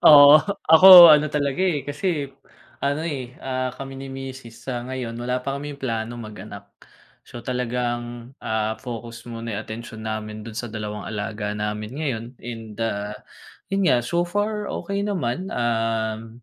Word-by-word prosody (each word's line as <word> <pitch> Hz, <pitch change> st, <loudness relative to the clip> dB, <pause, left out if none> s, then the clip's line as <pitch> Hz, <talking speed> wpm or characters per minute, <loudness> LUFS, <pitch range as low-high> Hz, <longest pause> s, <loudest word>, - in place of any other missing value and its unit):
Oo, 145 Hz, 0 st, +9 dB, 0.3 s
ako 175 Hz, -1 st, +11 dB
ano 150 Hz, 0 st, +4 dB
talaga, 145 Hz, +1 st, -1 dB
eh, 175 Hz, -7 st, +1 dB
kasi 150 Hz, +1 st, -2 dB, 0.6 s
ano, 145 Hz, +3 st, -1 dB
eh, 130 Hz, -5 st, -5 dB
ah, 130 Hz, -1 st, -2 dB
kami 135 Hz, 0 st, -7 dB
ni 135 Hz, -, -7 dB
misis 135 Hz, -3 st, -9 dB
sa 125 Hz, -2 st, -3 dB
ngayon 130 Hz, -3 st, -4 dB
wala 125 Hz, +1 st, -2 dB
pa 140 Hz, 0 st, -2 dB
kaming 145 Hz, 0 st, -7 dB
plano 115 Hz, -3 st, -3 dB
mag-anak. 105 Hz, -2 st, -10 dB, 0.5 s
So -, -, -11 dB
talagang, 120 Hz, -1 st, -3 dB
ah, 110 Hz, 0 st, -1 dB
focus 120 Hz, -2 st, -7 dB
muna 115 Hz, 0 st, -5 dB
'yung 105 Hz, -, -3 dB
atensyon 110 Hz, 0 st, -8 dB
namin 110 Hz, -1 st, -5 dB
do'n 110 Hz, 0 st, -9 dB
sa 120 Hz, -, -3 dB
dalawang 105 Hz, -1 st, -5 dB
alaga 105 Hz, 0 st, -4 dB
namin 105 Hz, +1 st, -4 dB
ngayon 130 Hz, -8 st, -2 dB, 0.2 s
and, 115 Hz, -2 st, -7 dB
ah, 105 Hz, -1 st, -2 dB, 0.6 s
'yun 195 Hz, -1 st, +1 dB
nga, 120 Hz, -6 st, +4 dB
so 170 Hz, +9 st, 0 dB
far 210 Hz, +3 st, -2 dB
okey 200 Hz, 0 st, -3 dB
naman, 180 Hz, -3 st, -2 dB
um, 115 Hz, -1 st, -2 dB
120 Hz, 155 wpm, -23 LUFS, 110-145 Hz, 0.6 s, ako